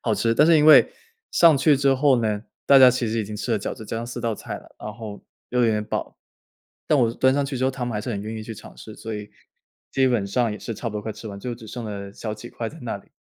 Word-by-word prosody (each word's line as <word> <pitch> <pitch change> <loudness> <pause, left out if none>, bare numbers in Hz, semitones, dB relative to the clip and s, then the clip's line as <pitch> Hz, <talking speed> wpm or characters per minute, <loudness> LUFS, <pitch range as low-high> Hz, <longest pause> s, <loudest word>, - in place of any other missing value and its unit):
好 110 - 0
吃。 115 +1 +1
但 150 - +5
是 165 -1 +6
因 150 - +4
为 155 - +8 0.4
上 165 -4 +6
去 145 +2 +4
之 135 0 +3
后 135 -2 +3
呢， 105 -1 -1 0.2
大 140 - +8
家 130 -1 +9
其 125 -1 -1
实 115 +1 -1
已 110 - -1
经 105 - -7
吃 105 +3 -2
了 110 - +2
饺 - - -4
子， 110 - -10
加 - - -4
上 115 - -5
4 120 0 -6
道 115 -2 -1
菜 - - -7
了， - - -19
然 105 - -6
后 110 -3 -9 0.3
又 125 - +1
有 - - +4
点 105 -1 0
饱。 - - -4 0.7
但 150 - +3
我 115 - +3
是 115 - -7
端 130 0 +3
上 140 +1 +1
去 135 -1 -4
之 130 - -2
后， 130 - +2
他 130 -2 -4
们 120 - -3
还 105 - -2
是 125 - -5
很 100 - -3
愿 110 +2 -6
意 110 - -6
去 115 - -7
尝 - - -13
试， 110 - -10
所 110 -1 -6
以 105 0 -7 0.6
基 135 -1 +2
本 115 -6 0
上 115 +3 0
也 105 - -6
是 115 - -6
差 115 - -4
不 105 - -10
多 105 - -3
快 110 +1 -4
吃 105 +2 -9
完， 100 - -8
就 120 +3 -5
只 115 - -13
剩 120 +2 -7
了 100 -2 -6
小 110 0 -5
几 110 +3 -10
块 115 - -5
在 160 - -10
那 120 - -4
里， - - -20
115 Hz, 330 characters per minute, -23 LUFS, 105-130 Hz, 0.7 s, 家